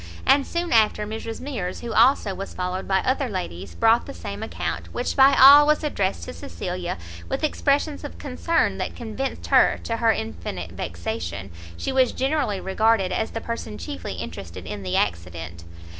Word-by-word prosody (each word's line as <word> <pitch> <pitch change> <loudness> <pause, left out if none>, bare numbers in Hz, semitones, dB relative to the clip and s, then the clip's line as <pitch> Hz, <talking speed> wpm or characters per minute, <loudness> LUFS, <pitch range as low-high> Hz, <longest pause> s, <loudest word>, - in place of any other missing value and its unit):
and 275 -1 +4
soon 340 -2 -2
after 215 -2 +3
Mrs 225 +1 -5
Mears, 235 -10 -4
who 235 -2 -5
also 225 -7 +4
was 195 +1 -7
followed 180 +1 -3
by 190 -1 +2
other 260 0 0
ladies, 100 - -5
brought 225 +1 +3
the - - -8
same - - -6
account, - - -4
which 245 - -1
by 270 +1 +7
all 285 +2 +10
was 300 +1 +3
addressed 190 - -1
to - - -7
Cecilia, 175 - -5 0.3
with - - -2
expressions 290 0 +1
of 290 - -7
concern 295 +5 0
that - - -3
convinced 240 +3 -4
her, - - +5
to 230 - -2
her 230 -1 +4
infinite 95 - -5
vexation, 85 +1 -5 0.3
she - - -2
was 260 -2 +3
generally 265 -7 0
regarded 195 0 +2
as 220 - -1
the 225 - -5
person 230 - -5
chiefly 90 -1 -6
interested 85 +3 -7
in 105 0 -5
the 95 -1 -1
accident. 85 -1 -3
210 Hz, 175 wpm, -24 LUFS, -, 0.3 s, all